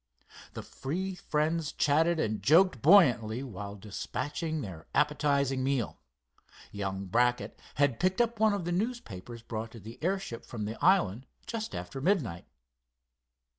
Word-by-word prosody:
The - - -6
three 185 +8 -4
friends 160 -2 -1
chatted 160 +3 +2
and 110 -7 -1
joked 165 - +5
buoyantly 130 - +5
while 100 -5 -7
dispatching 145 - -4
their 90 - -8
appetizing 140 -3 +2
meal. 135 -4 -1 0.7
Young 100 -1 -3
Brackett 120 +6 +1 0.2
had 140 -3 +2
picked 185 +3 +1
up 235 -2 +1
one 220 -1 +4
of 200 -4 -2
the 175 - -2
newspapers 125 - -4
brought 115 -1 -5
to 115 - -9
the 115 +7 -11
airship 190 -9 -2
from 110 -4 -5
the 110 +2 -6
island 130 - +3 0.2
just 225 -1 -4
after 135 - -6
midnight. 135 - 0
140 Hz, 135 wpm, -30 LUFS, 110-175 Hz, 0.7 s, joked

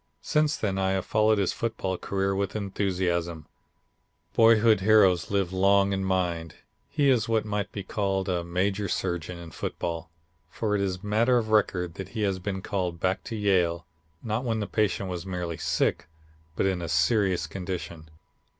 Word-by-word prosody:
Since 150 0 +1
then 95 -3 -1
I 95 0 +1
have 95 -1 -1
followed 110 0 +3
his 100 -3 +1
football 110 -5 -2
career 95 +1 -1
with 100 0 -2
enthusiasm. 90 -5 -1 0.9
Boyhood 115 -1 +5
heroes 95 -4 +4
live 95 -3 0
long 100 +1 +3
in 95 0 -1
mind. 90 -4 -1 0.3
He 140 -1 +2
is 115 -3 +1
what 110 -1 +1
might 105 -1 -2
be 100 - -5
called 95 -2 -1
a 90 -2 0
major 95 +4 -1
surgeon 85 -2 -2
in 85 -1 -10
football, 85 +2 -4 0.4
for 105 +4 -2
it 105 - +1
is 95 -2 0
a 90 +3 -12
matter 115 +4 +3
of 110 -2 -1
record 90 -5 +1
that 95 - -8
he 110 - 0
has 95 -2 0
been 95 0 -4
called 90 -4 -2
back 95 +2 0
to 115 - -5
Yale, 90 -5 +1 0.4
not 110 +2 -2
when 115 -3 -1
the 105 - -1
patient 100 -2 0
was 90 -2 -4
merely 90 -3 -4
sick, - - 0 0.5
but - - +1
in 95 -2 0
a 85 - -4
serious 90 +2 +2
condition. 85 -2 -6
95 Hz, 175 wpm, -27 LUFS, 90-105 Hz, 0.9 s, Boyhood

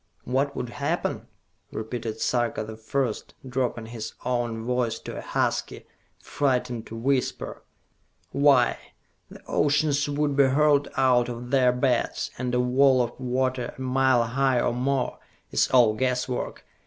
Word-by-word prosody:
"What 135 +3 0
would 125 - -4
happen?" 140 +4 -2 0.4
repeated 110 0 -5
Sarka 120 -3 0
the 110 0 -8
First, 115 +1 -3
dropping 125 -3 -2
his 115 -1 -7
own 120 -2 -1
voice 125 -1 0
to - - -8
a - - -5
husky, - - -2 0.3
frightened 125 -4 -1
whisper. 125 +4 -2 0.7
"Why, 140 -3 +4 0.5
the - - -13
oceans 145 0 +1
would 145 0 0
be 140 -1 +5
hurled 145 +1 +3
out 125 -2 +3
of 120 +1 -7
their 130 -2 +4
beds, 125 -1 0
and 125 -1 -1
a - - +2
wall 130 +1 +4
of 120 +1 -6
water 130 -1 -1
a - - -14
mile 130 -1 +3
high 130 +2 +1
or - - +1
more 130 +1 -1 0.3
it - - -29
is - - +4
all 120 -4 +5
guesswork! 125 +1 -2
125 Hz, 140 wpm, -26 LUFS, 120-135 Hz, 0.7 s, be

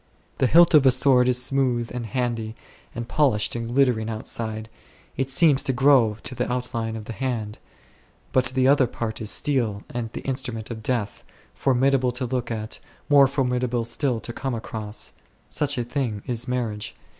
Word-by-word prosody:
The 130 - +3
hilt 170 +5 +6
of 150 -3 +7
a - - +9
sword 125 -1 +4
is 125 -1 +2
smooth 125 -2 0
and 120 -2 -4
handy, 115 -1 -2 0.4
and 120 -1 -5
polished 125 -9 +1
and 115 -1 -3
glittering 120 -3 +1
outside; 110 0 -3 0.5
it 135 +1 -2
seems 145 0 +4
to 135 -2 -1
grow 125 -5 +4
to - - -1
the 125 - -2
outline 120 -3 -3
of 110 -1 -7
the 115 - -6
hand 115 -4 -3
l; - - -35 0.6
but 130 -1 +3
the 130 +1 +2
other 140 -2 +4
part 110 -1 -5
is 110 - -3
steel 115 -9 0
and 120 -2 -4
the - - -5
instrument 125 -4 -4
of 110 -1 -6
death, 110 -3 -2 0.3
formidable 130 -1 +2
to 125 +1 -2
look 125 -1 -3
at, 110 -1 -4 0.3
more 140 -2 +7
formidable 125 -3 -1
still 115 +1 -1
to 120 - -5
come 135 0 -3
across. 110 -2 -5 0.4
Such 145 -2 -1
a 120 - 0
thing 120 -4 -3
is 120 0 -1
marriage. 115 -4 -3
125 Hz, 180 wpm, -24 LUFS, 115-130 Hz, 0.6 s, a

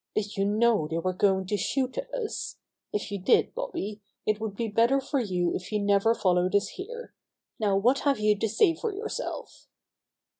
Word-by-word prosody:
"Did 210 -1 -1
you 195 -1 +1
know 215 -4 +3
they 165 +1 -2
were 185 +2 -1
going 190 0 +2
to 205 +3 -1
shoot 260 +6 -1
at - - -5
us? 455 -4 -4 0.3
If 205 0 -3
you 200 - -3
did, 185 - +3
Bobby, 215 - -4 0.2
it 215 0 +1
would 215 -3 -3
be 230 +2 -2
better 230 +6 +3
for 275 +1 -1
you 180 -6 0
if 180 - -5
you 210 - +1
never 205 +2 +3
followed 180 -1 +2
us 200 - +2
here. 475 +5 -8 0.5
Now 205 -3 +2
what 245 +7 +3
have 280 -3 +2
you 210 0 +3
to 220 - 0
say 330 - +4
for 435 +7 -3
yourself 415 +3 -6
215 Hz, 195 wpm, -27 LUFS, 195-270 Hz, 0.5 s, say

